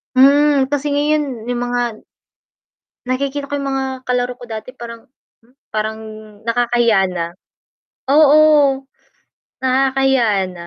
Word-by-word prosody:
Mm, 280 +1 +5
kasi 290 +1 -2
ngayon, 285 -5 -1
'yong 245 0 -2
mga 245 -2 -3 1.0
nakikita 280 +2 -3
ko 285 - -2
'yong 280 - -4
mga 270 0 -1 0.2
kalaro 250 0 -1
ko 245 - -11
dati 220 0 -7
parang, 230 -1 -10 0.3
hmm, 240 +3 -29 0.2
parang 215 0 -2 0.5
nakakahiyaya 235 -4 +2
na. 175 -2 -3 0.9
Oo. 295 -2 +5 0.8
Nakakahiya 260 -6 +2
na. 170 -1 -10
255 Hz, 115 wpm, -18 LUFS, 230-280 Hz, 1.0 s, Mm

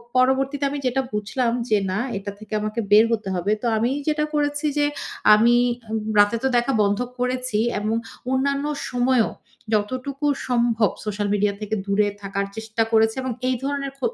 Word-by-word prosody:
পরবর্তীতে 265 +2 +2
আমি 285 +1 -4
যেটা 255 +1 +1
বুঝলাম 225 +4 0 0.2
যে, 215 - +4
"না 190 - -1 0.2
এটা 200 +1 -5
থেকে 215 0 -10
আমাকে 215 +2 -3
বের 215 +2 +8
হতে 220 -3 -1
হবে" 180 +3 -1
তো - - -4
আমি 230 +3 +1 0.2
যেটা 300 0 +1
করেছি 290 0 0
যে 290 - +3 0.5
আমি 230 +3 +5 0.2
এ্যা 220 -1 -4
রাতে 205 +2 +5
তো - - +3
দেখা 240 +3 +1
বন্ধ 200 0 +1 0.2
করেছি 250 -3 -1 0.2
এবং 215 +2 -1 0.4
অন্যান্য 280 +2 +1 0.3
সময়েও 245 -1 +2 0.4
যতটুকু 255 +7 -1 0.2
সম্ভব 235 -3 +2 0.2
সোশ্যাল 205 -1 -2
মিডিয়া 205 0 +1
থেকে 215 +1 -2
দূরে 200 +1 +2
থাকার 200 0 -2
চেষ্টা 220 0 -1
করেছি 220 0 +3
এবং 260 - -2 0.2
এই 255 - +2
ধরনের 280 0 -2
খ - - -30
230 Hz, 170 wpm, -23 LUFS, 210-260 Hz, 0.5 s, বের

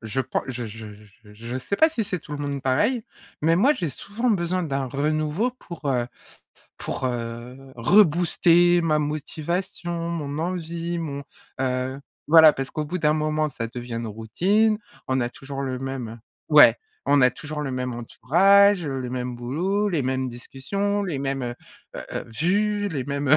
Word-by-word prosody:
je 110 +4 -2
prends 130 0 -2
je 125 -2 -4
je 110 0 -8 0.4
je 105 - -15
je 115 +3 -6
sais 200 +10 -3
pas 320 - +6
si 310 -8 -2
c'est 195 -3 -2
tout 150 - -11
le 145 - -4
monde 140 -2 -3
pareil, 215 - +1 0.4
mais 165 +2 +3
moi 255 +11 +5
j'ai 175 - -3
souvent 210 - -2
besoin 185 -2 0
d'un 135 -4 -2
renouveau 155 - 0
pour, 165 -4 -9
heu, 125 -3 +1 0.7
pour, - - -4
heu, 120 0 -5 0.2
rebooster 175 - +4
ma 155 -2 +2
motivation, 165 +3 -3
mon 150 -3 -4
envie, 170 0 -3
mon, 140 -4 -4 0.4
heu. 130 +1 -1 0.3
Voilà 160 -1 +9
parce 135 -1 -4
qu'au 155 - -3
bout 180 +4 -3
d'un 150 -2 +3
moment 155 0 0
ça 115 -3 -4
devient 120 0 -7
une 115 0 -3
routine, 185 - +1 0.3
on 130 0 +1
a 120 - 0
toujours 135 +2 -8
le 130 -1 -3
même 125 -4 -5 0.3
ouais, 150 -1 +8 0.3
on 145 - +4
a 125 0 +6
toujours 150 +4 -6
le 135 - -3
même 125 0 -2
entourage, 180 - +4
heu, 135 -1 -3
le 125 -1 -5
même 125 0 -3
boulot, 175 +13 -1
les 165 -6 0
mêmes 130 0 -1
discussions, 195 +12 -3
les 170 -8 -3
mêmes, 135 -1 -2
heu 120 -1 -3 0.4
heu - - -5
heu, - - -3
vues, 205 - +1
les 145 -8 -3
mêmes, 140 +1 -2
heu, 155 - +7
150 Hz, 180 wpm, -24 LUFS, 130-175 Hz, 0.7 s, Voilà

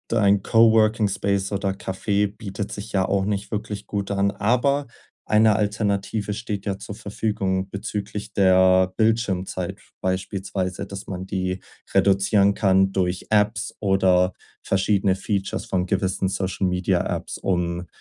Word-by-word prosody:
ein 100 -3 +3
Co-Working-Space 110 -3 +3
oder 100 0 0
Café 100 +2 -1
bietet 100 -1 -5
sich 105 +2 -7
ja 95 -2 +1
auch 100 -1 +1
nicht 100 0 -2
wirklich 105 -1 -4
gut 100 -1 -3
an, 100 0 +2
aber 125 +8 +1 0.4
eine 110 0 +4
Alternative 105 0 -1
steht 105 -2 -5
ja 100 -1 -2
zur 100 0 -8
Verfügung 100 -3 -2
bezüglich 105 +1 -5
der 95 -1 +4
Bildschirmzeit 95 -5 0 0.2
beispielsweise, 95 0 -2
dass 100 0 -8
man 95 -1 -5
die 95 -1 -2 0.3
reduzieren 100 +1 +4
kann 95 -2 +3
durch 90 -1 -1
Apps 105 0 +1
oder 95 -2 +3 0.3
verschiedene 95 0 +2
Features 100 0 -3
von 90 -1 -1
gewissen 95 0 0
Social 95 0 -1
Media 90 0 +1 0.2
Apps, - - -6
um 90 -1 -1
100 Hz, 130 wpm, -23 LUFS, 95-105 Hz, 0.4 s, eine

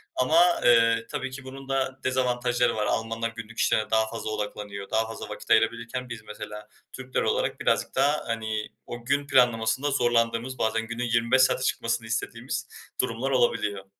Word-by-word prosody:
ama, 155 +7 +4 0.2
eee, 115 -1 +5
tabii 135 0 -3
ki 130 0 -8
bunun 135 +1 -10
da 135 -1 -1
dezavantajları 125 -1 +1
var. 105 -1 0
Almanlar 115 +1 -1
günlük 115 -1 -10
işlerine 110 - +1
daha 110 0 +3
fazla 115 -1 -5
odaklanıyor. 105 -1 -5
Daha 110 0 +1
fazla 115 - -7
vakit - - -9
ayırabilirken 120 +2 +1
biz 115 -2 -7
mesela 105 0 -8 0.3
Türkler 130 0 -3
olarak - - 0
birazcık - - 0
daha, 145 +3 +2
hani, 110 -2 -2 0.2
o 120 0 -7
gün 140 +2 0
planlamasında 125 +1 +3
zorlandığımız, 120 +1 +1
bazen 115 0 0
günün 115 +1 -4
25 115 +2 +3
saate 130 - +3
çıkmasını 115 -1 -1
istediğimiz 120 +2 -3 0.3
durumlar 125 +2 -2
olabiliyor. 105 -6 +1
115 Hz, 160 wpm, -26 LUFS, 110-130 Hz, 0.3 s, eee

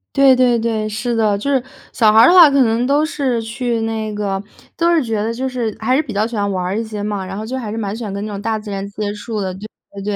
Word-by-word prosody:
对 275 -1 +6
对 250 -2 +3
对， 225 -2 -1
是 215 +3 -3
的。 215 -3 +2
就 280 +7 -2
是 270 -2 +2 0.3
小 215 -3 +3
孩 220 - +6
儿 240 - +8
的 - - +5
话， 345 -5 +9
可 275 -1 +4
能 235 +2 +1
都 290 +2 +2
是 265 -7 -1
去 230 0 -2
那 220 -1 -3
个 195 -2 -2 0.4
都 335 0 +2
是 315 - +2
觉 220 -3 -2
得 225 +2 -2
就 260 +3 -3
是 235 -4 -3
还 250 +4 +1
是 280 - +3
比 260 -8 -8
较 205 +2 +1
喜 230 -1 -5
欢 200 0 0
玩 185 -2 -2
儿 190 +4 -2
一 - - -1
些 215 -2 -5
嘛， 205 -2 -3
然 195 +1 -6
后 215 - -5
就 255 +4 -4
还 225 - -5
是 220 - -5
蛮 205 -2 -3
喜 235 - -8
欢 210 -4 -4
跟 200 +1 -4
那 215 - -5
种 200 - -5
大 220 +1 -1
自 210 -1 -8
然 195 0 -4
接 205 0 -3
触 210 +1 -5
的， 185 -1 -3
对 190 - -10 0.4
对 200 - -6
225 Hz, 325 characters per minute, -18 LUFS, 205-245 Hz, 0.4 s, 话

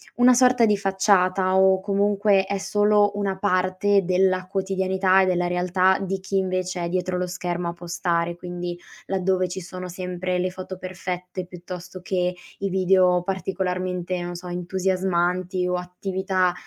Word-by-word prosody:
una 245 0 +6
sorta 250 -2 +5
di 210 -1 +3
facciata 190 -1 +2
o 190 0 +5
comunque 200 0 +2
è 200 0 -2
solo 205 +1 +3
una 200 -2 -1
parte 190 +1 +2
della 185 0 +2
quotidianità 190 0 +2
e - - +2
della 180 -1 +1
realtà 180 +1 +2
di 195 0 -3
chi 195 +1 -2
invece 185 -1 -1
è - - -1
dietro 180 0 -1
lo 180 - -1
schermo 175 -1 -3
a - - -4
postare. 170 0 -2
Quindi, 175 0 -6 0.3
laddove 185 -1 +1
ci 185 +2 -5
sono 185 +1 -7
sempre 180 0 -3
le 185 +1 -1
foto 185 0 -7
perfette 180 0 -5
piuttosto 180 0 -9
che 180 -1 -1 0.2
i 195 0 -1
video 185 -1 +3
particolarmente, 185 -1 -2
non 175 0 -5
so, 175 +1 -9
entusiasmanti 180 0 -1
o 180 0 0
attività, 185 0 -1
185 Hz, 150 wpm, -24 LUFS, 180-190 Hz, 0.3 s, una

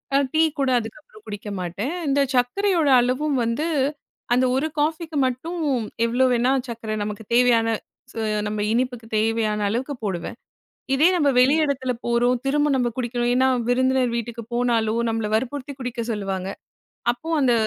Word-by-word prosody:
அ - - +6 0.2
tea 315 - +4 0.2
கூட 270 -1 +2
அதுக்கப்பறம் 220 -1 -11
குடிக்க 205 0 -6
மாட்டேன். 195 - -3
இந்த 280 +1 +2 0.2
சர்க்கரையோட 325 +6 +2
அளவும் 260 +3 0
வந்து 230 +8 -1 0.7
அந்த 255 +1 +3
1 275 +4 +1
காஃபிக்கு 315 +1 -1
மட்டும் 315 +8 -3 0.5
எவ்வளோ 245 +3 +2
வேணா 245 +2 +2 0.2
சர்க்கரை 230 -2 -5
நமக்கு 210 +1 -5
தேவையான 240 -2 +4 0.5
சு - - -12 0.3
நம்ம 210 0 -3
இனிப்புக்கு 245 -2 -1
தேவையான 215 -1 +1
அளவுக்கு 255 +6 -2
போடுவேன். 190 +2 -3 0.6
இதே 300 +6 +5
நம்ப 295 -5 +3
வெளி 260 +4 +5
இடத்தில 260 -3 -1
போறோம் 240 +1 +2
திரும்ப 295 +2 +2
நம்ப 245 -2 +1
குடிக்கணும். 240 0 -1
ஏன்னா 260 +1 +4 0.2
விருந்தினர் 260 -1 +2
வீட்டுக்கு 235 0 -4
போனாலும் 235 -2 +1
நம்மள 225 -1 -1
வற்புறுத்தி 275 +4 -3
குடிக்க 250 -2 -4
சொல்லுவாங்க. 195 -2 -3 0.6
அப்போ 250 +7 -10
அந்த 260 -3 +3
245 Hz, 145 wpm, -23 LUFS, 225-270 Hz, 0.7 s, அ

